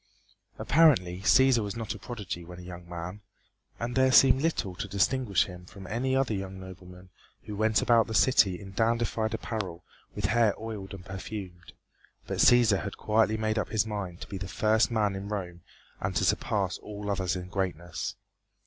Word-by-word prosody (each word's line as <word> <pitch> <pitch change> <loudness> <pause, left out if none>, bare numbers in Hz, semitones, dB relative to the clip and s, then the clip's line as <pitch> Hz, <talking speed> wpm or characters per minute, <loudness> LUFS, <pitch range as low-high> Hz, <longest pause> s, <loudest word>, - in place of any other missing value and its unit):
Apparently 125 - +3
Cæsar 130 +2 +5
was 100 -1 -4
not 115 -2 -4
a - - -10
prodigy 100 -7 -6
when 90 +1 -10
a 90 - -10
young 90 -1 -10
man, 90 +4 -6 0.6
and 120 +1 -3
there 130 0 +4
seemed 130 +2 +6
little 145 - -1
to 100 - -4
distinguish 100 +1 +2
him 90 -1 -11
from 95 0 -11
any 125 +7 -1
other 135 -4 +1
young 95 -1 -5
nobleman 90 0 -12 0.3
who 105 - -7
went 110 +1 +2
about 115 -1 +4
the 110 - -4
city 100 -8 +4
in 95 -1 -10
dandified 115 +1 0
apparel 95 -7 -5 0.3
with 105 - -3
hair 110 0 +3
oiled 105 -4 -6
and 90 -2 -12
perfumed, 95 -2 -8 0.5
but - - -4
Cæsar 115 -6 +5
had - - -6
quietly 110 0 +2
made 110 0 0
up - - -3
his 110 0 +1
mind 100 -5 -5
to - - -7
be 95 - -6
the 95 - -5
first 110 +4 +2
man 105 -4 +1
in 100 +1 -6
Rome 90 -4 -5 0.4
and 95 -1 -3
to - - +2
surpass 95 -3 0
all 105 -1 -5
others 95 -3 -1
in 90 0 -6
greatness. 90 -3 -3
100 Hz, 185 wpm, -28 LUFS, 95-115 Hz, 0.6 s, seemed